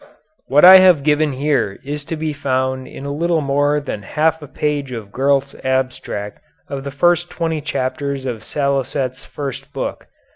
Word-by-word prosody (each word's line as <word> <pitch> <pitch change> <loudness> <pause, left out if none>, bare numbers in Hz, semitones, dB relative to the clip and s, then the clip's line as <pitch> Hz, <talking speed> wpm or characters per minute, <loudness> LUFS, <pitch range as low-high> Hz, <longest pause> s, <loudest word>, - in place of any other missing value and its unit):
What 145 +5 +6
I 190 +1 +12
have 180 -6 +5
given 150 0 +2
here 135 -7 0
is 145 +1 -4
to 165 - -4
be 155 -1 -3
found 130 -2 -1
in 135 - -9
a 140 - -3
little 165 +2 +1
more 145 +1 +1
than 135 -7 -5
half 160 +9 0
a 150 - -9
page 145 -2 -2
of 110 -5 -7
Gurlt's 140 +2 +1
abstract 130 -6 -2 0.3
of 135 -1 -5
the 140 - -4
first 175 +4 +2
twenty 165 -2 -2
chapters 140 -1 -3
of 115 -4 -4
Salicet's 135 -2 -2
first 140 0 -7
book. 135 - -5
140 Hz, 170 wpm, -19 LUFS, 130-150 Hz, 0.3 s, I